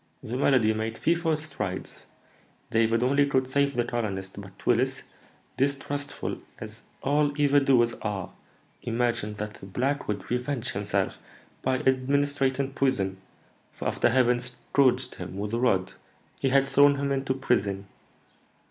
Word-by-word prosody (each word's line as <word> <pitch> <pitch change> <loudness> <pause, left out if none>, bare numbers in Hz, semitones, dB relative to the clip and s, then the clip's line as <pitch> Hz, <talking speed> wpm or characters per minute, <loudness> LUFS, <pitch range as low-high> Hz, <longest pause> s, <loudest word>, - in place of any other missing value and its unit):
"The 115 - -4
malady 125 -5 +3
made 110 +1 -3
fearful 165 -1 +1
strides. 120 -12 -5 0.6
David 115 +1 +2
only 140 +3 +3
could 130 -2 +2
save 140 +2 +1
the 120 -1 +1
colonist, 100 -5 -3
but 100 -1 -14
Willis, 130 +3 +1 0.5
distrustful, 140 +1 -2 0.2
as - - -9 0.2
all 145 +1 +1
evil 145 0 +5
doers 125 -4 +3
are, 100 -3 -3 0.5
imagined 115 -3 -1
that 105 0 -4
the 95 - -12
black 135 +8 -1
would 105 +2 -4
revenge 125 0 -1
himself 100 -1 -1 0.4
by 130 0 +1
administering 135 0 +1
poison; 100 -9 0 0.5
for, - - -5
after - - +2
having 125 -1 +3
scourged 125 +1 +1
him 90 +2 -6
with 105 +2 -4
a 115 - +1
rod, 95 -7 +1 0.5
he 135 - +1
had 135 +1 +4
thrown 140 +1 +5
him 140 0 -1
into 135 -1 0
prison. 100 -7 0
125 Hz, 140 wpm, -27 LUFS, 110-140 Hz, 0.6 s, evil